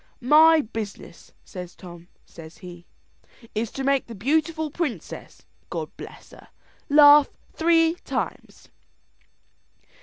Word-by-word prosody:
"My 315 Hz, +4 st, +6 dB
business," 215 Hz, -7 st, -9 dB
says 180 Hz, -2 st, -9 dB
Tom, 175 Hz, -1 st, -13 dB, 0.2 s
says 165 Hz, 0 st, -13 dB
he, 175 Hz, -1 st, -12 dB, 0.7 s
"is 220 Hz, +1 st, -2 dB
to 270 Hz, -, -5 dB
make 275 Hz, 0 st, +1 dB
the 230 Hz, -, -9 dB
beautiful 310 Hz, -, -1 dB
princess, 305 Hz, -6 st, -6 dB, 0.2 s
God -, -, -6 dB
bless -, -, -12 dB
her, -, -, -16 dB, 0.4 s
laugh 290 Hz, 0 st, +7 dB, 0.2 s
three 330 Hz, 0 st, +3 dB
times." -, -, -6 dB
270 Hz, 110 wpm, -24 LUFS, 185-310 Hz, 0.7 s, laugh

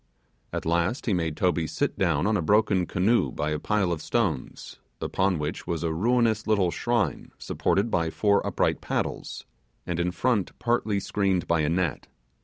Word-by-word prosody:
At -, -, -4 dB
last 85 Hz, -, 0 dB
he 110 Hz, -, +1 dB
made 80 Hz, -4 st, -1 dB
Toby 85 Hz, -3 st, +1 dB
sit -, -, -1 dB
down -, -, +1 dB
on 110 Hz, +1 st, +2 dB
a 100 Hz, -, +1 dB
broken 100 Hz, 0 st, +2 dB
canoe 105 Hz, +6 st, +2 dB
by 75 Hz, +1 st, -2 dB
a 75 Hz, -, -1 dB
pile 100 Hz, 0 st, 0 dB
of 80 Hz, -2 st, -2 dB
stones, 85 Hz, -, -2 dB, 0.2 s
upon 95 Hz, -2 st, 0 dB
which 75 Hz, +2 st, -4 dB
was 85 Hz, -1 st, -2 dB
a 80 Hz, -1 st, 0 dB
ruinous 115 Hz, +4 st, +1 dB
little 100 Hz, -5 st, +2 dB
shrine 120 Hz, 0 st, -1 dB
supported 105 Hz, +4 st, 0 dB
by 85 Hz, -1 st, +1 dB
four 100 Hz, +4 st, +2 dB
upright -, -, 0 dB
poles, -, -, -3 dB, 0.4 s
and 85 Hz, -1 st, -2 dB
in 85 Hz, +1 st, +1 dB
front 105 Hz, +2 st, 0 dB
partly 115 Hz, -4 st, 0 dB
screened 95 Hz, -3 st, 0 dB
by 85 Hz, -1 st, +2 dB
a 75 Hz, -1 st, +1 dB
net. 85 Hz, -2 st, -1 dB
95 Hz, 175 wpm, -26 LUFS, 85-105 Hz, 0.4 s, on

